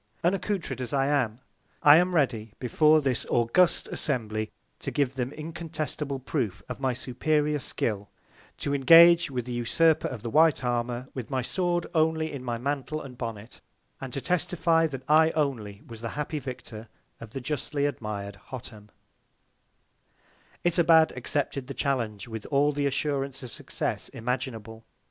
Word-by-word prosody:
Unaccoutred 180 - -1
as 125 0 -5
I 135 -1 +2
am, 130 -5 0 0.4
I 145 +1 +9
am 180 +1 +2
ready, 115 -8 0
before 155 +5 +4
this 130 -4 +1
august 120 +10 +3
Assembly, 110 -6 0 0.3
to - - -4
give 140 -3 0
them 130 -1 -3
incontestable 155 -3 -4
Proof 125 - -3
of - - -6
my 135 -1 +1
superior 150 +4 0
Skill; 105 -5 -3 0.5
to 140 - -2
engage 165 +4 +7
with 125 -3 -3
the 125 - -6
Usurper 150 +7 +2
of 115 -4 -7
the 115 - -4
White 155 -2 +4
Armour 120 +1 -2
with 125 -4 -6
my 130 -2 -1
Sword 175 +4 -1
only 160 -1 +1
in 135 -3 -6
my 120 -2 -2
Mantle 140 +4 -3
and 135 -4 -9
Bonnet; 115 -2 -7 0.4
and 135 -2 -6
to 135 - -3
testify 165 -1 +2
that 135 -4 -7
I 160 +1 +6
only 115 -9 -2
was 115 -2 -10
the 115 - -4
happy 150 +1 -2
Victor 120 -4 -8 0.3
of 115 -2 -11
the 135 - -3
justly 145 +2 -2
admired 105 -7 -4
Hottam. 110 -5 -9 1.8
Itobad 165 -2 +5
accepted 135 +1 -2
of - - -22
the 135 - -5
Challenge 120 -7 -2
with 110 -2 -7
all 145 +1 +3
the 145 -1 0
Assurance 140 -1 -2
of 125 - -8
Success - - -4
imaginable. 115 -2 -4
135 Hz, 155 wpm, -27 LUFS, 120-155 Hz, 1.8 s, I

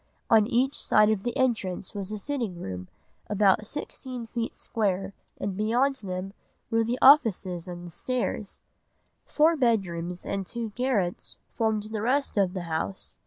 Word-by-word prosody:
On 220 -2 +6
each 260 +3 +1
side 215 0 +5
of 210 -3 0
the 240 +4 -3
entrance 215 -8 0
was 200 -1 -4
a 215 - -3
sitting 230 -6 -3
room 90 - -6 0.4
about 205 0 +3
sixteen 255 -4 -5
feet 230 0 -4
square 195 -3 -1 0.2
and 200 -2 -3
beyond 245 +7 +2
them 190 -2 -5 0.4
were 225 0 +3
the 235 +2 -1
offices 205 - +5
and 175 -1 -7
the 175 - -9
stairs. 240 0 -3 0.6
Four 315 +2 +4
bedrooms 180 - 0
and 195 0 -2
two 230 -2 -4
garrets 215 -7 -1 0.2
formed 220 -2 0
the 215 0 -4
rest 270 +5 +1
of 195 -2 +2
the 185 - -3
house. 170 +3 -4
215 Hz, 155 wpm, -27 LUFS, 185-240 Hz, 0.6 s, On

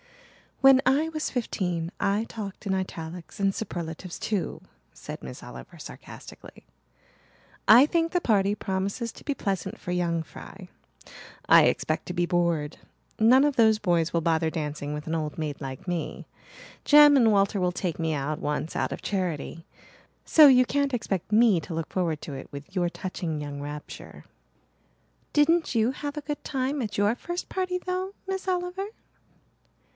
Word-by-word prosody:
"When 270 -1 +7
I 285 +5 +3
was 310 -1 -3
fifteen 180 -8 -2
I 200 +2 +1
talked 205 -2 -7
in 195 - 0
italics 175 -2 -5
and 195 -1 +2
superlatives 175 -3 -5
too," 205 -4 -2 0.3
said - - -8
Miss 65 -1 -8
Oliver 60 0 -11
sarcastically. - - -12 1.0
"I 245 +5 +9
think 330 0 +1
the 355 - +1
party 200 - +2
promises 200 +4 -3
to - - -14
be 285 - -1
pleasant 195 -6 -3
for 180 - -6
young 170 -2 0
fry. - - -12 0.8
I - - +8
expect 155 - 0
to 180 - -4
be 175 0 +1
bored. 170 -4 0 0.4
None 245 +5 +6
of 290 -2 +2
those 220 -3 +5
boys 175 -5 +1
will 170 - +2
bother 160 0 +1
dancing 150 -2 -4
with 150 0 -5
an 160 - -3
old 155 -2 -3
maid 155 -3 -4
like 135 +4 -7
me. 175 -2 -4 0.6
Jem 295 0 +8
and 235 -5 +5
Walter 200 0 +2
will 180 -1 +1
take 180 -2 -3
me 160 -1 0
out 150 +2 -2
once 150 +2 -3
out - - -1
of - - -6
charity. 170 -4 -3 0.6
So 310 -2 +8
you 255 -2 +6
can't 280 0 0
expect 200 -5 -3
me 215 -4 +5
to 165 - -7
look 165 -1 -3
forward 165 -5 -1
to 145 - -6
it 135 - -7
with 140 +5 -10
your 175 -2 +1
touching 170 -4 -4
young 145 -1 -6
rapture." 145 +1 -9 1.1
"Didn't 320 +2 +3
you 225 +2 +3
have 290 +2 -6
a - - -2
good 295 0 -5
time 270 +1 -2
at 205 -3 -4
your 205 +3 +3
first 345 +7 -5
party, 370 -1 -1
though, 370 +1 -3
Miss 385 0 -4
Oliver?" 365 +1 -2
195 Hz, 165 wpm, -26 LUFS, 165-265 Hz, 1.1 s, I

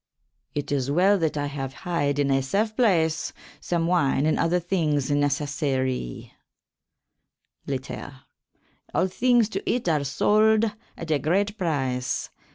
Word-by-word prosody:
It 145 -1 -3
is 135 -2 0
well 190 +7 +4
that 160 -2 0
I 145 - -1
have 135 -2 -5
hyd 145 -5 0
in 140 -1 +1
a 135 0 +3
safe 210 +11 -1
place 165 -9 +2 0.3
some 170 -1 -1
wyne 150 -5 +2
and 155 - +1
other 170 +2 +2
thynges 155 -6 0
necessarie. 140 - -1 1.4
Later. 135 0 -5 0.7
All - - +3
thynges 235 +4 +3
to 195 - -3
eat 240 -4 0
are 155 -4 +2
solde 215 +9 +3 0.2
at 165 -1 -5
a 150 - +2
great 195 +9 +1
pryce. 135 - -2
155 Hz, 135 wpm, -25 LUFS, 140-190 Hz, 1.4 s, well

